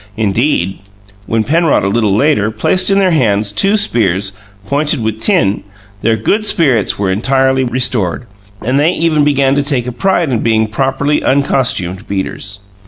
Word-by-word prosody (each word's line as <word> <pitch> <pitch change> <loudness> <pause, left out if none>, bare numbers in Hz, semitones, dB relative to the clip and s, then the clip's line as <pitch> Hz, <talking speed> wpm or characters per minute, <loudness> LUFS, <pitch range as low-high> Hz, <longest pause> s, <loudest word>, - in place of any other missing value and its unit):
Indeed, 105 - 0 0.5
when 115 -1 0
Penrod, 160 - +1
a - - 0
little 105 -1 +1
later, 110 -4 +2
placed 185 - +1
in 195 - +3
their 190 -2 +2
hands 105 -9 +1
two 195 - +2
spears, 100 - +1 0.3
pointed 145 +3 -1
with 110 0 -3
tin, 170 - +2 0.4
their 115 0 +2
good 200 - 0
spirits 135 - +1
were 100 -2 -1
entirely 130 +5 +1
restored, 120 -5 -1 0.4
and 130 +4 +1
they 160 +5 +2
even 160 -3 +1
began 140 -2 +2
to 145 - +1
take 140 -4 -1
a 125 - -4
pride 175 +2 0
in 120 - 0
being 110 -1 +1
properly 135 +5 -1
uncostumed 120 -9 0
beaters. 100 +1 -5
125 Hz, 160 wpm, -13 LUFS, 105-150 Hz, 0.5 s, in